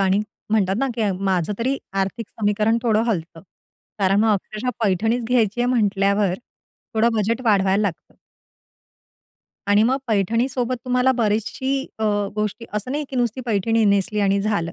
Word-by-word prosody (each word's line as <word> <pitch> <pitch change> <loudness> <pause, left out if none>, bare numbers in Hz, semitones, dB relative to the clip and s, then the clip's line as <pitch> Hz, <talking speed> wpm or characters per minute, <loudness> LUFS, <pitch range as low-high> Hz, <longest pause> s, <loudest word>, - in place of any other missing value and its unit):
आणि 195 +1 +3 0.3
म्हणतात 195 -3 +2
ना, 270 - +1
की 215 -3 0
माझं 185 0 +1
तरी 260 +4 0 0.2
आर्थिक 200 +3 -3
समीकरण 215 +1 +1
थोडं 220 -2 +2
हलत. 170 -7 -2 0.6
कारण 195 +1 +3
मग 220 0 +3
अक्षरशः 215 +4 -2
पैठणीच 225 +4 +1
घ्यायची 235 -2 +1
आहे 245 - +2
म्हंटल्यावर, 200 -4 +2 0.6
थोडं 225 +2 +3
बजेट 220 +3 0
वाढवायला 200 -2 +3
लागतं. 195 -6 -4 1.5
आणि 205 +1 +4
मग 250 +4 +3
पैठणी 230 +3 +1
सोबत 250 -1 -2
तुम्हाला 250 +1 +2
बरीचशी 230 +5 0 0.2
अ, 220 - -1 0.3
गोष्टी 210 +2 -2
असं 210 +4 -3
नाही 295 +1 -2
की 265 - -4
नुसती 245 0 0
पैठणी 225 +1 +1
नेसली 200 +1 +2
आणि 200 0 +2
झालं. 195 -5 -1
215 Hz, 150 wpm, -22 LUFS, 200-235 Hz, 1.5 s, आणि